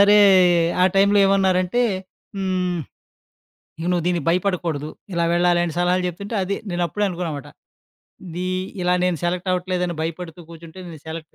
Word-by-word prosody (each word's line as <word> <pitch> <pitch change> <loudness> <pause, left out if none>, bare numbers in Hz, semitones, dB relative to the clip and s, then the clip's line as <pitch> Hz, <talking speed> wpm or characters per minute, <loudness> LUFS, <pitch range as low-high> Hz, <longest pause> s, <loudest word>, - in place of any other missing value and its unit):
సరే, 205 +1 +7 0.6
ఆ - - +7
టైంలో 200 +1 +4
ఏవన్నారంటే, 190 +2 +2 0.6
హ్మ్, 185 -2 -1 1.0
ఇగ 170 - -3
నువ్వు 175 -2 0
దీనికి 175 -4 0
భయపడకూడదు, 170 -5 0 0.2
ఇలా 170 -1 +1
వెళ్ళాలని 175 -1 +2
సలహాలు 180 +1 +2
జెప్తుంటే, 200 +5 -5
అది. 200 +2 -2
నేనప్పుడే 175 +3 -1
అనుకున్నామాట, 170 -6 -4 0.8
ఇదీ 175 +2 -4 0.4
ఇలా 180 0 +2
నేను 180 -2 +1
సెలెక్టవ్వట్లేదని 180 0 -1
భయపడుతూ 165 +1 -5
కూర్చుంటే 165 +2 -12
నేను 160 -3 -10
సెలెక్ట్ 160 -1 -8
180 Hz, 125 wpm, -22 LUFS, 170-185 Hz, 1.0 s, సరే